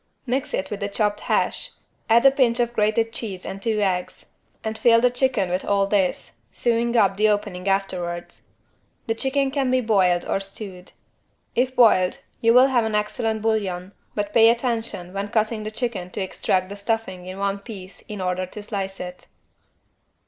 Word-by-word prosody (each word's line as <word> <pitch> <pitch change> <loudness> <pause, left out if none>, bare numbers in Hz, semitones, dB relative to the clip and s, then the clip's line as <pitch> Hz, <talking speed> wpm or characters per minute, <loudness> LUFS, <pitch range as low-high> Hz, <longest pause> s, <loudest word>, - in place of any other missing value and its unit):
Mix 260 +2 -1
it 190 - -4
with 205 - -3
the 200 -1 -2
chopped 205 0 0
hash, - - -1 0.4
add 235 +3 +5
a 270 - +9
pinch 250 -3 +2
of 240 0 +1
grated 225 +1 +1
cheese 195 -7 -5
and 195 - -6
two 215 0 0
eggs 185 -3 -1 0.4
and 220 0 -3
fill 230 0 +5
the 250 +1 +3
chicken 245 -6 +1
with 180 +1 -1
all 200 -1 +2
this, 190 - -1
sewing 235 0 +1
up 195 -3 +3
the 215 +1 +4
opening 195 -3 -2
afterwards. 180 -3 -2 0.6
The 225 - 0
chicken 270 +3 0
can 270 -2 0
be 255 0 +3
boiled 190 -7 +2
or - - 0
stewed. 195 -2 -8 0.6
If 255 +1 0
boiled 200 -7 +5 0.2
you 230 - +4
will 250 +2 +7
have 245 -3 +3
an 220 -1 -1
excellent 220 +1 -1
bouillon, 195 -5 -1 0.2
but 205 0 -2
pay 225 -1 +7
attention 230 -7 -1
when 200 +1 -2
cutting 215 0 0
the - - -2
chicken 215 -5 -3
to 195 - -5
extract 185 0 -1
the 200 - -6
stuffing 200 -3 -3
in 185 +1 -7
one 200 0 -1
piece 195 -3 -10
in 210 -2 -7
order 180 0 -1
to 210 +3 -9
slice 195 -2 -4
it. 180 0 -8
210 Hz, 180 wpm, -23 LUFS, 190-230 Hz, 0.6 s, a